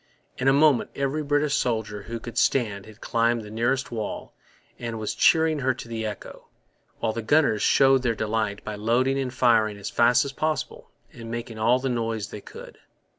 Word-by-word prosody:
In 130 - 0
a - - +7
moment 145 -2 +4
every 140 +2 -1
British 145 0 +1
soldier 110 -5 -1
who 115 +3 -6
could 115 0 -9
stand 115 -4 +1
had 110 +1 -15
climbed 115 0 +1
the 105 - -10
nearest 120 +4 -1
wall 110 -3 -5 0.5
and 115 -1 -4
was 110 -1 -3
cheering 160 -2 +3
her 130 -2 0
to 125 - -9
the 110 -1 -3
echo; 105 - -9 0.5
while 110 - -1
the 115 - -3
gunners 125 -3 +2
showed 135 -1 +4
their 120 -2 0
delight 105 -1 -2
by 105 - -5
loading 120 +6 +1
and 130 -2 -2
firing 115 -4 +2
as 100 - -6
fast 120 +2 +4
as 140 - -4
possible 155 +2 -3 0.2
and 115 -1 -9
making 115 -1 -6
all 115 +3 +4
the 130 +1 -3
noise 115 -3 -2
they 105 - -8
could. - - -12
115 Hz, 190 wpm, -25 LUFS, 110-135 Hz, 0.5 s, a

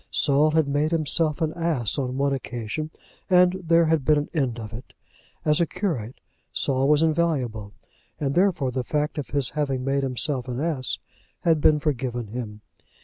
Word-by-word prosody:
Saul 145 +1 +3
had 155 -1 +2
made 145 +2 +1
himself 155 0 0
an 160 -1 0
ass 155 -10 -1
on 130 -1 -2
one 140 0 +1
occasion, 125 +3 -4 0.4
and 180 -1 +5
there 165 0 +4
had 160 -3 +2
been 150 +2 +4
an 145 - -2
end 130 -7 -1
of 110 -1 -8
it. 120 +5 -10 0.5
As 150 +1 +3
a 170 - +2
curate 150 - -3 0.3
Saul 135 -1 +1
was 150 +1 +4
invaluable, 135 -11 0 0.5
and 140 -2 -1
therefore 170 -7 +2
the 130 0 -2
fact 150 +2 -1
of 145 - -4
his 140 -3 +2
having 135 -4 -1
made 140 0 +1
himself 130 0 -1
an 125 0 -4
ass 145 -5 +1 0.4
had 160 -3 +2
been 150 0 +5
forgiven 125 -6 -2
him. 110 -2 -6
145 Hz, 175 wpm, -24 LUFS, 125-155 Hz, 0.5 s, and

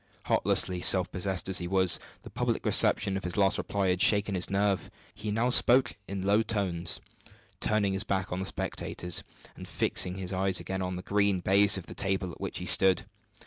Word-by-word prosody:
Heartlessly 90 -1 +1
self 95 0 +3
possessed 95 -1 -2
as 95 - +2
he 90 - -5
was, 95 -1 +3 0.2
the - - -12
public - - -3
reception 100 -2 +4
of 95 - -7
his 90 +2 -4
last 100 0 +2
reply 100 -2 -2
had 90 0 0
shaken 100 -1 +3
his 90 -1 +1
nerve. 100 -1 -1 0.2
He 105 0 -7
now 115 +4 0
spoke 125 0 +4
in 100 -1 -5
low 100 +2 +3
tones, 95 -6 -1 0.6
turning 105 -2 0
his 95 +2 -3
back 95 -3 -3
on 90 - -3
the 95 - -4
spectators, 90 -2 -4 0.3
and - - -11
fixing 90 0 -1
his 95 0 -5
eyes 95 0 0
again 95 0 -5
on 90 0 -4
the 90 - -7
green 100 -1 0
baize 100 +2 +3
of 95 - -8
the - - -10
table 95 -2 -2
at - - -13
which - - -5
he - - -6
stood. 95 -2 +5
95 Hz, 200 wpm, -28 LUFS, 90-100 Hz, 0.6 s, stood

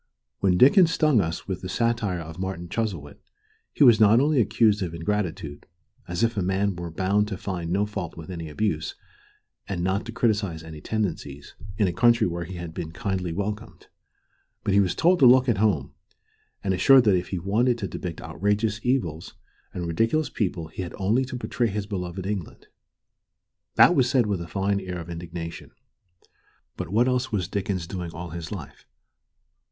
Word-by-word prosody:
When 95 -2 +2
Dickens 165 - +7
stung 155 - +3
us 80 -1 -4
with 95 -2 -4
the 90 - -6
satire 115 -5 0
of 80 +1 -9
Martin 95 -2 -4
Chuzzlewit, 90 -11 -3 0.5
he - - +2
was 120 -4 +7
not 110 +2 +6
only 145 -1 +3
accused 110 -2 +2
of 85 -3 -3
ingratitude 85 -4 -3 0.4
as 90 +5 -2
if 115 0 +1
a 100 - 0
man 95 +2 0
were 85 -1 -5
bound 95 +5 +1
to 100 -3 -4
find 90 -4 -4
no 100 +4 +1
fault 100 -6 -6
with 80 +2 -8
any 85 -3 -6
abuse, 80 -1 -2 0.7
and 90 -3 -2
not 95 +2 0
to - - -4
criticise 105 -9 0
any 80 -2 -10
tendency, 80 -9 -3 0.3
in 105 - +3
a 90 - -1
country 115 +5 +4
where 85 -1 -3
he 95 +2 -8
had 85 -2 -7
been 80 -2 -5
kindly 90 0 -3
welcomed 105 +5 -5 0.7
but 100 - 0
he 100 - +5
was 95 -3 +1
told 175 +2 +3
to 130 - +7
look 130 +1 +6
at 115 -6 +1
home, 95 -11 +1 0.7
and 95 - +1
assured 130 +7 +6
that 105 -4 +4
if 90 0 -1
he 95 - -3
wanted 110 +7 +1
to 100 -4 -3
depict 85 -3 -6
outrageous 105 - -1
evils 90 - -1 0.4
and 90 - -4
ridiculous 115 - 0
people 90 -6 -2
he 80 - -6
had 90 - -6
only 105 +7 +2
to 130 -1 -6
portray 120 0 -1
his 105 -1 -3
beloved 95 -2 -5
England. 100 -4 -5 1.1
That - - +7
was 130 -7 +3
said 130 -3 +3
with 100 -4 -1
a 85 - -6
fine 100 +2 0
air 95 -2 -5
of 85 0 -7
indignation. 85 0 -7 1.1
But - - -5
what 115 +6 +3
else 125 0 0
was 95 -5 -1
Dickens 95 -3 -2
doing 90 -1 -5
all 85 +1 -7
his 85 -1 -6
life? - - -9
95 Hz, 185 wpm, -25 LUFS, 85-110 Hz, 1.1 s, Dickens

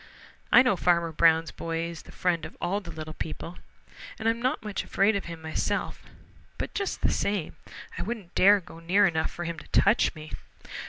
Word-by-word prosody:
"I - - +8
know 250 -6 +3
Farmer 170 -1 +2
Brown's 160 0 +3
boy 165 0 -3
is 170 -1 -6
the - - -15
friend 175 -3 0
of - - -8
all 195 +4 -1
the 175 - -11
little 155 -1 -7
people, 165 +2 -6 0.6
and 220 - -2
I'm 230 +1 +1
not 255 -1 0
much 210 -2 -3
afraid 200 +2 +2
of 200 - -2
him 165 -1 -8
myself, 160 0 -2 0.6
but - - -4
just 395 -2 -3
the - - +2
same 200 -6 -1 0.4
I - - -2
wouldn't 210 -4 -5
dare 205 +2 +6
go 165 -2 -13
near 180 +5 +3
enough 160 -3 +1
for 175 - -6
him 170 -1 -4
to - - -14
touch 210 -1 +3
me." 155 0 -10
175 Hz, 200 wpm, -27 LUFS, 165-205 Hz, 0.6 s, I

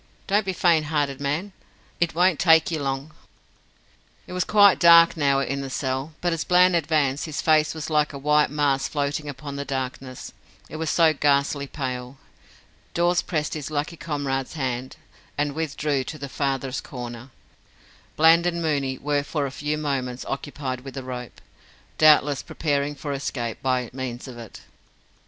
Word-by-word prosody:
don't 205 0 +1
be - - +1
faint 170 -4 +2
hearted, 145 -3 -1
man. 150 +8 -2 0.5
It 170 -2 0
won't 180 -2 +3
take 160 +1 +5
ye 160 - -1
long." 135 +2 -3 1.1
It - - -9
was 180 0 0
quite 205 -2 +5
dark 170 -1 +7
now 140 -3 +2
in 140 +1 -2
the 135 - -5
cell, 135 +3 -3
but 175 -1 +1
as 165 - -2
Bland 180 0 +4
advanced 150 -4 +1
his 155 -3 -5
face 155 0 +3
was 155 - -5
like 150 -1 +1
a 140 - -7
white 150 +2 +3
mask 145 -2 0
floating 145 0 -2
upon 140 +1 -7
the 140 - -3
darkness, 130 -1 -5 0.4
it - - -7
was 160 -1 -2
so 165 0 +4
ghastly 140 0 +1
pale. 130 -2 -5 0.8
Dawes 175 +1 +2
pressed 150 -3 -2
his 150 -2 -5
lucky 155 +2 -3
comrade's 140 -5 -3
hand, 130 -3 -3 0.4
and 145 0 0
withdrew 150 -3 -1
to 155 - -6
the 140 -1 -6
farthest 135 -1 -2
corner. 120 -1 -8 0.9
Bland 165 +2 +5
and 170 -1 -1
Mooney 140 -5 -1
were 145 +1 0
for 145 0 -2
a 135 - -4
few 150 +2 -3
moments 130 -4 -3
occupied 135 -2 -4
with 135 0 -10
the 135 - -5
rope 125 -1 -7 0.6
doubtless 150 -2 +5
preparing 145 -1 -2
for 145 0 -5
escape 120 -4 -4
by 130 -2 0
means 130 -1 -5
of 120 -2 -9
it. 115 -3 -11
145 Hz, 165 wpm, -24 LUFS, 135-160 Hz, 1.1 s, dark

